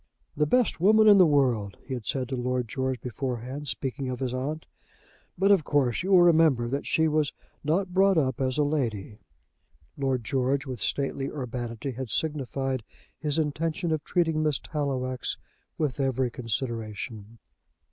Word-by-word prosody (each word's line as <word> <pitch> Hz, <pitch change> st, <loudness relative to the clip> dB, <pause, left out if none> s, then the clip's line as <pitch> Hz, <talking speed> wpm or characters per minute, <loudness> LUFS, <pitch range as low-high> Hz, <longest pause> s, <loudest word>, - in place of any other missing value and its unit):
"The 150 Hz, 0 st, +1 dB
best 250 Hz, +1 st, +2 dB
woman 215 Hz, +3 st, +6 dB
in 205 Hz, -2 st, +8 dB
the 180 Hz, -, +7 dB
world," 125 Hz, -9 st, +1 dB
he 135 Hz, -, -5 dB
had 120 Hz, -5 st, -5 dB
said 130 Hz, -2 st, -1 dB
to 135 Hz, -, -2 dB
Lord 125 Hz, -1 st, -1 dB
George 130 Hz, +2 st, -2 dB
beforehand, 130 Hz, +3 st, -4 dB
speaking 130 Hz, +3 st, -3 dB
of 125 Hz, -1 st, -4 dB
his 130 Hz, -2 st, -2 dB
aunt; 145 Hz, +5 st, -3 dB, 0.7 s
"but, 195 Hz, +3 st, +4 dB
of 195 Hz, -6 st, +5 dB
course, 135 Hz, -6 st, +1 dB
you 185 Hz, -, -3 dB
will 180 Hz, -2 st, +7 dB
remember 160 Hz, -8 st, +4 dB
that 140 Hz, +4 st, -3 dB
she 160 Hz, 0 st, +2 dB
was 155 Hz, -2 st, +1 dB, 0.3 s
not 180 Hz, +5 st, 0 dB
brought 195 Hz, 0 st, +4 dB
up 130 Hz, -4 st, +1 dB
as 130 Hz, 0 st, 0 dB
a 150 Hz, -, +3 dB
lady." 115 Hz, -9 st, -2 dB, 0.8 s
Lord 135 Hz, -3 st, 0 dB
George, 135 Hz, +3 st, 0 dB
with 130 Hz, -5 st, -6 dB
stately 135 Hz, -1 st, -1 dB
urbanity, 120 Hz, -2 st, -4 dB
had 130 Hz, 0 st, -6 dB
signified 135 Hz, -3 st, -1 dB, 0.4 s
his 150 Hz, +1 st, -1 dB
intention 160 Hz, +2 st, -1 dB
of 155 Hz, -2 st, -1 dB
treating 165 Hz, -3 st, +1 dB
Miss 150 Hz, -3 st, +1 dB
Tallowax 130 Hz, -4 st, -3 dB, 0.4 s
with 150 Hz, -2 st, -1 dB
every 130 Hz, -2 st, 0 dB
consideration. 115 Hz, -2 st, -4 dB
135 Hz, 160 wpm, -27 LUFS, 125-155 Hz, 0.8 s, in